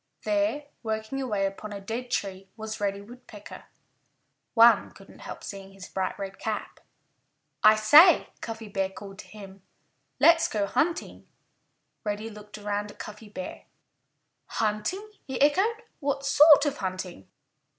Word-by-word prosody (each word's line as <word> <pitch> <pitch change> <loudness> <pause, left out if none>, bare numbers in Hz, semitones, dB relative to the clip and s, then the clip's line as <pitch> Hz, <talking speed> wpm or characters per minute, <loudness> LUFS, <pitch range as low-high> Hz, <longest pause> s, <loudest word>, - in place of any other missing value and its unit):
There, 305 -1 0 0.2
working 220 +4 -3
away 210 -7 -1
upon 195 +2 -5
a 200 - -6
dead 230 +5 -5
tree, 195 -4 -3
was 220 -1 -6
Reddy 200 0 -1
Woodpecker. 220 -1 -12 0.9
One 235 0 +6
couldn't - - -16
help - - -9
seeing 195 -1 -9
his 195 -1 -11
bright 190 -1 -3
red 195 -1 -7
cap. 220 -1 -4 0.8
"I 215 0 +8
say," 295 - +7
Cuffy 225 -1 -6
Bear 195 -1 -1
called 195 0 -11
to - - -10
him, 195 -2 -12 0.6
"let's 335 0 +6
go 210 -2 -1
hunting!" 325 - -2 0.8
Reddy 215 +1 -4
looked 210 0 -11
around 205 0 -3
at - - -18
Cuffy 210 0 -10
Bear. 275 +6 -8 0.8
"Hunting!" 220 - -2 0.2
he 265 - -4
echoed. 395 - +2 0.2
"What 275 -1 -2
sort 300 0 +7
of 290 -1 -1
hunting?" 185 - -5
215 Hz, 140 wpm, -27 LUFS, 200-270 Hz, 0.9 s, I